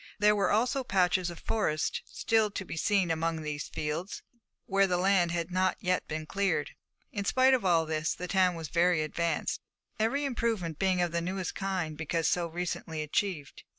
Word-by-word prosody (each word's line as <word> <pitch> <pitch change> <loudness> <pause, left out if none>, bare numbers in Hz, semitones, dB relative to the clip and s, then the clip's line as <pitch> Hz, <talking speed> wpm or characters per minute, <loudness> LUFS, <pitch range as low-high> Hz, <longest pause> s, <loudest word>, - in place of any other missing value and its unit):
There 210 0 +4
were 200 -1 +2
also 250 +5 +2
patches 185 -4 +2
of 170 - -8
forest 155 -9 -1
still 220 -2 +1
to 200 -1 -5
be - - -6
seen 185 +1 +2
among 165 0 -1
these 150 -1 -4
fields, 155 +6 -4 0.4
where 195 0 +3
the 180 -1 +1
land 185 -1 +3
had 170 0 -2
not 185 0 +1
yet 180 0 0
been 155 0 -4
cleared. 195 +4 0 0.4
In 205 -6 -3
spite 260 +5 +4
of 255 - +2
all 170 -3 +3
this, 155 0 -1
the 180 - -5
town 185 -1 +3
was 165 -3 -6
very 170 -2 +3
advanced, 165 +1 -1 0.4
every 275 +7 +1
improvement 225 - -1
being 185 -2 +2
of 175 - -1
the 170 0 0
newest 185 +1 -3
kind 185 -5 -2
because 160 +1 -1
so 175 -1 +1
recently 165 -2 -4
achieved. 155 -1 -2
180 Hz, 185 wpm, -30 LUFS, 165-200 Hz, 0.4 s, There